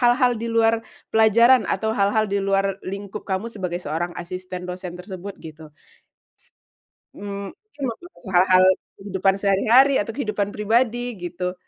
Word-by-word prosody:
hal-hal 245 0 +4
di - - -2
luar 225 0 +4 0.4
pelajaran 230 +3 +5
atau 220 - -1
hal-hal 205 +2 +2
di 200 - +1
luar 195 0 0
lingkup 200 +2 -6
kamu 190 +4 -1
sebagai 180 -3 -4
seorang 170 +3 -3
asisten 185 +1 -7
dosen 180 -1 -6
tersebut 190 +1 -8
gitu? 160 0 -10 1.5
Ss - - -15
mmm, 200 -1 -6
mungkin 430 -3 -22
ngobrol 350 +10 -8
soal 190 -6 -8
hal-hal 185 0 +5 0.3
kehidupan 195 -1 0
sehari-hari 230 +8 +4
atau 225 +2 -6
kehidupan 210 -6 -1
pribadi 235 +2 0
gitu. 180 +1 -4
200 Hz, 145 wpm, -22 LUFS, 185-225 Hz, 1.5 s, pelajaran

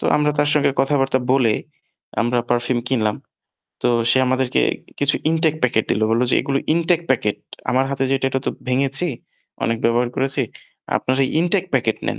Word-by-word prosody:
তো - - -7
আমরা 150 0 +2
তার 145 0 +3
সঙ্গে 145 -2 +3
কথাবার্তা 135 -1 +1
বলে 120 -5 +3 0.7
আমরা 120 +1 0
পারফিউম 120 +1 +1
কিনলাম। 110 -5 0 0.7
তো - - +3 0.2
সে 130 - +4
আমাদেরকে 130 0 +1 0.4
কিছু 145 +1 +2
ইনটেক 160 -1 +2
প্যাকেট 115 -3 +2
দিল। - - +1
বলল 115 +2 +2
যে - - +3
এগুলো 140 0 -1 0.2
ইনটেক 170 0 +2
প্যাকেট। 105 -5 +1 0.3
আমার 130 +1 +2
হাতে 135 -1 -1
যেটা 135 0 +1
এটা 135 - -1
তো - - +2 0.2
ভেঙেছি, 135 +6 +1 0.6
অনেক 115 - +1
ব্যবহার 120 +1 +2
করেছি। 135 +1 0 0.5
আপনারা 130 +1 0 0.2
ইনটেক 180 +2 +1
প্যাকেট 115 -4 +1
নেন। - - -2
130 Hz, 165 wpm, -20 LUFS, 120-140 Hz, 0.7 s, সে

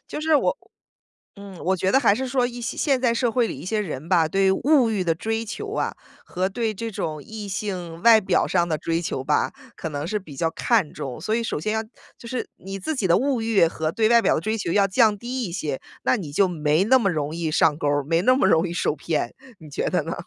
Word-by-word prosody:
就 - - -5
是 315 0 +2
我 - - +1 0.8
嗯， 200 -3 -11
我 190 +1 +2
觉 190 +2 0
得 270 - +6
还 220 -6 +4
是 260 +2 -3
说 250 -1 +1
一 245 0 -7
些 235 - -4
现 275 -4 +1
在 240 -2 +2
社 235 -1 0
会 245 -2 +2
里 - - -5
一 150 - -9
些 215 +3 -1
人 155 -6 -5
吧， 165 -4 +3
对 195 +2 +3
物 260 0 +3
欲 200 -4 0
的 165 -1 +1
追 225 +5 -2
求 415 - -6
啊， - - -1 0.3
和 185 +1 -1
对 220 +1 -2
这 225 +3 -5
种 155 -6 -4
异 215 +1 -8
性 185 -4 -5
外 230 -2 +7
表 190 - +1
上 175 -2 +1
的 155 - 0
追 165 0 -1
求 135 -5 -3
吧， 150 - +1 0.3
可 160 - -4
能 145 +1 -4
是 210 +3 -1
比 155 -8 -12
较 165 +3 0
看 205 -4 +1
重， 135 -4 -6
所 215 +6 -1
以 230 - 0
首 225 - -2
先 215 +7 -1
要 220 - 0 0.4
就 235 - -10
是 250 0 -3
你 195 +1 -7
自 255 +12 -3
己 200 - 0
的 170 - +4
物 265 -3 0
欲 220 -6 +4
和 160 -1 -2
对 220 +2 +2
外 235 0 +6
表 - - +3
的 - - -1
追 220 +3 -1
求 170 - -2
要 200 +1 +4
降 215 +1 +3
低 250 +2 -4
一 175 - -5
些， 150 -7 -3 0.2
那 - - +3
你 155 -7 -6
就 190 +6 +3
没 155 +1 +1
那 260 +4 +5
么 200 -5 +1
容 155 -2 -2
易 165 -2 -2
上 150 -1 +3
钩 145 - -1
儿， 145 -1 +1
没 165 +3 +1
那 255 +5 +4
么 195 - +3
容 170 0 +3
易 - - -5
受 155 - 0
骗。 155 +1 -2 0.3
你 155 -2 -12
觉 - - -2
得 180 - +1
呢？ 165 - -4
195 Hz, 280 characters per minute, -23 LUFS, 165-230 Hz, 0.8 s, 外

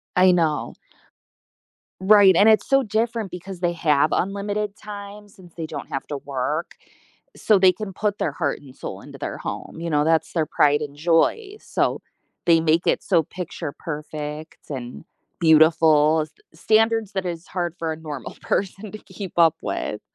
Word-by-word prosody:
I 185 0 +6
know. 165 -4 0 1.3
Right, 195 -1 +6
and 205 +5 +6
it's 215 -2 +3
so 270 0 +4
different 220 -2 -1
because 180 +1 -8
they 175 -1 +1
have 155 -3 +2
unlimited 200 +1 -2
time 205 0 -10
since 185 -4 -17
they 165 - -4
don't - - -7
have 135 - -4
to 145 - -4
work, 140 +4 -3 0.6
so 215 - +3
they 185 -1 +6
can 210 0 -7
put 205 +1 -1
their 155 - -2
heart 145 -2 -2
and 135 -3 -15
soul - - -7
into - - -12
their - - -5
home, - - -6
you 170 0 -4
know, 150 -2 +2
that's 160 0 +1
their 160 -3 +1
pride 145 0 +2
and 145 -1 -6
joy, 175 - +1
so - - -1 0.4
they 165 -1 +5
make 160 +1 +2
it - - +2
so 165 - +2
picture 160 -3 -6
perfect 150 0 -6
and 130 +1 -7 0.3
beautiful, 160 -1 +5
s 155 - -12 0.3
standards 220 0 +2
that 190 -1 -2
is 170 -1 -5
hard 175 -2 -3
for 160 -1 -2
a - - -9
normal 150 -6 -7
person 195 +1 -2
to 215 - -7
keep 195 -4 -9
up 165 -1 +5
with. - - -4
170 Hz, 175 wpm, -23 LUFS, 155-200 Hz, 1.3 s, I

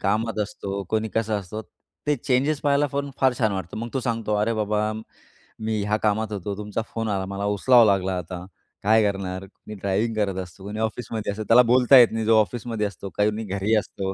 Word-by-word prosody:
कामात 110 +3 0
असतो, 100 -1 -5
कोणी 110 0 0
कसं 110 -1 0
असतं, 100 +3 -7 0.5
ते 150 0 +2
चेंजेस 140 +4 +1
पाहायला 145 0 +2
पण 140 0 -2
फार 130 -1 +4
छान 110 -4 +2
वाटतं. 95 -3 -5
मग 115 +1 -4
तो 135 - +1
सांगतो, 115 -3 -1
"अरे 105 +2 +1
बाबा 105 0 0 0.7
मी 110 -1 -1
ह्या 105 +1 +1
कामात 110 0 +1
होतो, 100 0 -4
तुमचा 105 +1 -3
फोन 115 -1 -2
आला, 95 -2 -1
मला 100 +1 -4
उचलावा 120 +3 +6
लागला, 95 -2 +1
आता 90 +1 -6 0.4
काय 110 +2 +5
करणार?" 95 -1 -5
कुणी 105 +2 -12
ड्रायव्हिंग 100 +4 0
करत 100 -3 0
असतो, 90 +2 -14
कुणी 105 +2 -6
ऑफिसमध्ये 110 -1 -3
असतं, 105 +2 -5
त्याला 115 +4 +7
बोलता 125 +1 +7
येत 120 -2 +9
नाही. 110 0 -2
जो 110 0 +5
ऑफिसमध्ये 115 0 -3
असतो, 100 0 -8
कोणी 105 +2 +1
घरी 100 +2 0
असतो, 95 -2 -3
105 Hz, 200 wpm, -24 LUFS, 100-115 Hz, 0.7 s, येत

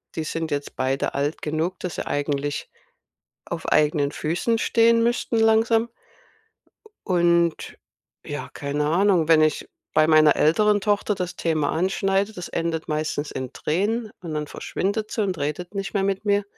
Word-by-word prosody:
Die 160 - -2
sind 160 +1 -3
jetzt 145 0 -3
beide 130 +1 -1
alt 145 +3 -2
genug, 160 +4 -2
dass 180 -4 -5
sie - - -4
eigentlich 145 0 -2 0.8
auf - - -6
eigenen 150 -1 +2
Füßen 175 +9 0
stehen 230 0 +3
müssten 235 -1 0
langsam. 225 +1 +3 1.2
U 185 - -2
und 170 -1 +2 0.5
ja, 145 0 -5
keine 145 +1 -2
Ahnung. 175 -1 +3
Wenn 160 -1 +6
ich 155 -1 0 0.3
bei 155 0 +5
meiner 155 -2 +5
älteren 205 +6 +3
Tochter 205 +1 +1
das 180 -2 -4
Thema 155 -3 0
anschneide, 195 +3 0
das 180 -2 -7
endet 165 -1 -2
meistens 150 -1 -2
in 130 0 -5
Tränen 215 +8 -1
und 165 -3 -6
dann 150 0 -2
verschwindet 205 +7 -3
sie 220 - -1
und 190 -3 -1
redet 150 +7 -4
nicht 195 +1 -4
mehr 195 -1 +1
mit 195 +1 -1
mir. 205 0 +2
170 Hz, 160 wpm, -23 LUFS, 150-205 Hz, 1.2 s, Wenn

